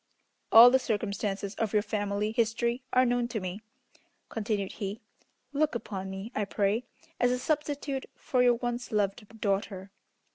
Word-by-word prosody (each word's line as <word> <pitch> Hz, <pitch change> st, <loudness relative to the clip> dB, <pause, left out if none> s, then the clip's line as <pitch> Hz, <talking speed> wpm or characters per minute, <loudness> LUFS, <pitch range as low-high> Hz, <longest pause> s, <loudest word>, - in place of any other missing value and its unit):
"All 235 Hz, +2 st, +10 dB
the 260 Hz, -, +5 dB
circumstances 200 Hz, -3 st, -2 dB
of 225 Hz, -2 st, -1 dB
your 210 Hz, -1 st, +3 dB
family 205 Hz, 0 st, -1 dB
history 235 Hz, +2 st, 0 dB
are 255 Hz, 0 st, +5 dB
known 245 Hz, -1 st, +1 dB
to 235 Hz, -2 st, -3 dB
me," 185 Hz, +2 st, -5 dB, 0.7 s
continued 210 Hz, -3 st, -2 dB
he. 205 Hz, +1 st, -5 dB, 0.5 s
"Look 295 Hz, -2 st, +1 dB
upon 195 Hz, -4 st, -4 dB
me, 190 Hz, +4 st, -6 dB
I 210 Hz, -, 0 dB
pray, 205 Hz, +4 st, 0 dB, 0.3 s
as 245 Hz, -, +4 dB
a 250 Hz, -, +1 dB
substitute 285 Hz, -1 st, -2 dB
for 255 Hz, -, 0 dB
your 245 Hz, -1 st, +5 dB
once 240 Hz, 0 st, -4 dB
loved 210 Hz, +1 st, -2 dB
daughter. 195 Hz, -1 st, -2 dB
220 Hz, 150 wpm, -29 LUFS, 200-245 Hz, 0.7 s, All